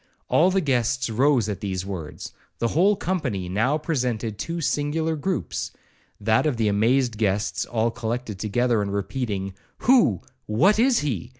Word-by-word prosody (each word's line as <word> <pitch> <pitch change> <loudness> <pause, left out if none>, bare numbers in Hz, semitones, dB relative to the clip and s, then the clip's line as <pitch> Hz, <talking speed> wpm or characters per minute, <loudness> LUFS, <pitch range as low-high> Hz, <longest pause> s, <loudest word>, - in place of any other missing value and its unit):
All 175 +4 +4
the 190 0 +1
guests 130 -4 0
rose 125 -1 +3
at 105 -2 -3
these 95 -2 -3
words,—the 95 +5 -6
whole 190 - +3
company 140 - -2
now 110 +11 +1
presented 125 -9 -2
two 170 +6 -3
singular 160 +1 0
groupes, 150 - -2 0.5
that 110 +7 +2
of 140 -6 0
the 110 -2 +1
amazed 115 +3 +2
guests 100 -1 0
all 115 0 0
collected 115 -3 -4
together, 115 +2 +1
and 100 -1 -2
repeating, 100 -2 -3 0.3
'Who, 225 - +4 0.3
what 175 - +3
is 250 0 +4
he?' 120 - -3
120 Hz, 145 wpm, -24 LUFS, 105-150 Hz, 0.5 s, All